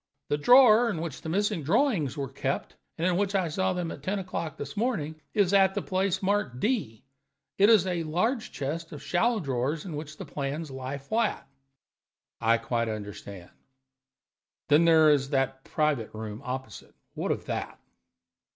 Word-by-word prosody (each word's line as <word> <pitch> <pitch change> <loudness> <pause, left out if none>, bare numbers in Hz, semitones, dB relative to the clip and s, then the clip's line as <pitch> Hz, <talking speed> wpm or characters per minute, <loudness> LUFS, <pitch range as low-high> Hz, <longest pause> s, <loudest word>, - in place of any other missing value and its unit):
The 145 - +1
drawer 240 - +7
in 175 - -2
which 160 -3 -5
the 160 - -6
missing 205 0 0
drawings 170 - +1
were 140 -1 -2
kept, 135 +1 -3 0.2
and 165 - -1
in 180 -1 +2
which 200 0 0
I 185 -4 +1
saw 190 +4 0
them 180 -2 -3
at - - -8
ten 190 +8 -2
o'clock 180 -5 -4
this 140 0 -7
morning, 175 - -2
is 200 -3 +3
at 195 -1 +5
the - - 0
place 190 0 -1
marked 190 -11 0
D; 205 - -1 0.6
it 200 +2 +6
is 215 -5 +6
a 175 -2 -1
large 185 - -1
chest 160 +4 -4
of 150 - -9
shallow 225 +6 +1
drawers 140 +1 -2
in 170 -5 -5
which 150 0 -7
the - - -7
plans 145 +2 -4
lie 130 +1 -5
flat." 175 0 -1 0.9
"I 115 0 +3
quite 115 0 -1
understand. 100 -3 -7 1.2
Then 150 +3 +5
there 160 -2 +6
is 135 -2 +1
the 135 -2 +1
private 150 -8 0
room 110 +1 -6
opposite. 130 -4 -7 0.2
What - - -2
of - - -3
that?" - - -4
160 Hz, 170 wpm, -28 LUFS, 135-195 Hz, 1.2 s, drawer